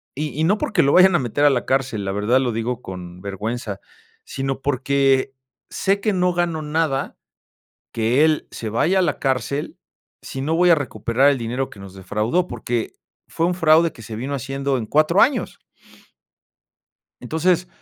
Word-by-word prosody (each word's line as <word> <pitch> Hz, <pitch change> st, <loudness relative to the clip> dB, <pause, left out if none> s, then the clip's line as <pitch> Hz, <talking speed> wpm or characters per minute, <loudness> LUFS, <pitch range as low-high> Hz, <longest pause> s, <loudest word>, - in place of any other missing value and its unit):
y 150 Hz, +1 st, -4 dB
y -, -, +2 dB
no 200 Hz, +6 st, +3 dB
porque -, -, +1 dB
lo 140 Hz, -, +3 dB
vayan 185 Hz, 0 st, +6 dB
a -, -, +3 dB
meter, 130 Hz, +3 st, 0 dB
a -, -, +7 dB
la 125 Hz, -3 st, -1 dB
cárcel, 130 Hz, -6 st, -1 dB
la 95 Hz, -, -2 dB
verdad 105 Hz, +6 st, +2 dB
lo 125 Hz, -2 st, 0 dB
digo 115 Hz, +2 st, -3 dB
con 90 Hz, -2 st, -9 dB
vergüenza, 105 Hz, +1 st, -4 dB, 0.5 s
sino 135 Hz, 0 st, -3 dB
porque, 135 Hz, 0 st, +1 dB, 0.4 s
sé 195 Hz, +1 st, 0 dB
que 215 Hz, -, +1 dB
no 180 Hz, -1 st, +1 dB
gano 170 Hz, -2 st, -1 dB
nada, 150 Hz, -2 st, -1 dB, 0.8 s
que 115 Hz, +6 st, +2 dB
él 155 Hz, -1 st, 0 dB
se 110 Hz, -, -5 dB
vaya 165 Hz, -, +2 dB
a -, -, +4 dB
la 160 Hz, -5 st, -1 dB
cárcel, 135 Hz, +2 st, -2 dB, 0.4 s
si 135 Hz, -, -6 dB
no 155 Hz, +4 st, 0 dB
voy 180 Hz, +1 st, +4 dB
a -, -, +7 dB
recuperar 135 Hz, -2 st, +1 dB
el 140 Hz, -, -1 dB
dinero 125 Hz, +3 st, -3 dB
que 100 Hz, -, -14 dB
nos 100 Hz, -1 st, -11 dB
defraudó. 105 Hz, -, -1 dB
Porque 120 Hz, -1 st, -3 dB, 0.3 s
fue 165 Hz, -, -1 dB
un 180 Hz, -, 0 dB
fraude 165 Hz, -1 st, +4 dB
que -, -, -13 dB
se 110 Hz, 0 st, -8 dB
vino 130 Hz, +6 st, -4 dB
haciendo 135 Hz, 0 st, -2 dB
en 115 Hz, -, -4 dB
4 155 Hz, -, +3 dB
años. 270 Hz, +3 st, +1 dB, 1.6 s
Entonces, 175 Hz, +2 st, 0 dB
135 Hz, 180 wpm, -21 LUFS, 115-160 Hz, 1.6 s, a